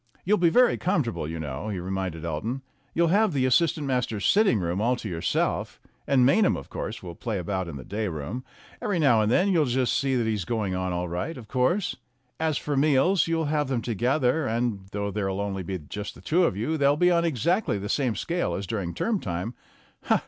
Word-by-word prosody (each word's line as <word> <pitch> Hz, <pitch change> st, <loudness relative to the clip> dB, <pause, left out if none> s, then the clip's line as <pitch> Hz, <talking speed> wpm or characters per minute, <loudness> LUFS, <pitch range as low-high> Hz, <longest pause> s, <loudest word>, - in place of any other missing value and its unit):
"You'll 210 Hz, +3 st, +3 dB
be 175 Hz, -1 st, +5 dB
very 250 Hz, +7 st, +4 dB
comfortable, 145 Hz, -, -1 dB
you 80 Hz, +1 st, -5 dB
know," 75 Hz, +6 st, -4 dB
he 100 Hz, -, -3 dB
reminded 90 Hz, -2 st, -3 dB
Elton. 110 Hz, -, -3 dB, 0.3 s
"You'll 170 Hz, 0 st, +3 dB
have 205 Hz, +1 st, +3 dB
the 130 Hz, -2 st, +1 dB
as 130 Hz, -, +3 dB
sistant 165 Hz, -1 st, +2 dB
masters' 125 Hz, -6 st, -1 dB
sitting 205 Hz, -, +4 dB
room 90 Hz, +2 st, -1 dB
all 120 Hz, +3 st, +2 dB
to 120 Hz, -, -6 dB
yourself, 85 Hz, -4 st, -1 dB, 0.3 s
and 130 Hz, -3 st, +4 dB
Maynham, 200 Hz, -, +4 dB
of 70 Hz, -, -10 dB
course, -, -, -5 dB
will 85 Hz, -2 st, -7 dB
play 110 Hz, +4 st, -3 dB
about 95 Hz, 0 st, -2 dB
in 85 Hz, -, -6 dB
the 65 Hz, -, -7 dB
day 105 Hz, +3 st, -2 dB
room. 90 Hz, -, -5 dB, 0.4 s
Every 205 Hz, -4 st, 0 dB
now 130 Hz, -9 st, +4 dB
and 105 Hz, +1 st, +1 dB
then 185 Hz, +9 st, +3 dB
you'll 165 Hz, -6 st, +3 dB
just 125 Hz, 0 st, +1 dB
see 135 Hz, -1 st, +1 dB
that 120 Hz, -2 st, +1 dB
he's 110 Hz, -4 st, -1 dB
going 105 Hz, -3 st, -2 dB
on 95 Hz, 0 st, -1 dB
all 90 Hz, 0 st, -2 dB
right, 90 Hz, -, -3 dB
of 115 Hz, -4 st, -10 dB
course. 130 Hz, -, +1 dB, 0.4 s
As 160 Hz, -3 st, +1 dB
for 145 Hz, -, -2 dB
meals, 150 Hz, +7 st, +3 dB
you'll 165 Hz, -1 st, 0 dB
have 150 Hz, -1 st, 0 dB
them 130 Hz, -3 st, -1 dB
together, 125 Hz, +5 st, +1 dB
and 115 Hz, -4 st, -1 dB
though 100 Hz, 0 st, -2 dB
there'll 95 Hz, -1 st, -2 dB
only 100 Hz, -1 st, -2 dB, 0.3 s
just 105 Hz, +6 st, -6 dB
be 155 Hz, -, -5 dB
you 180 Hz, -, +5 dB
two 120 Hz, +11 st, -1 dB
they'll 140 Hz, +1 st, +4 dB
be 180 Hz, +2 st, +4 dB
on 170 Hz, -1 st, +3 dB
exactly 170 Hz, -, +1 dB
the 100 Hz, +1 st, -5 dB
same 125 Hz, -1 st, 0 dB
scale 175 Hz, +1 st, -1 dB
as 100 Hz, -, -4 dB
during 90 Hz, -4 st, -3 dB
term 225 Hz, -3 st, 0 dB
time. 90 Hz, -, -4 dB
120 Hz, 215 wpm, -26 LUFS, 95-155 Hz, 0.4 s, be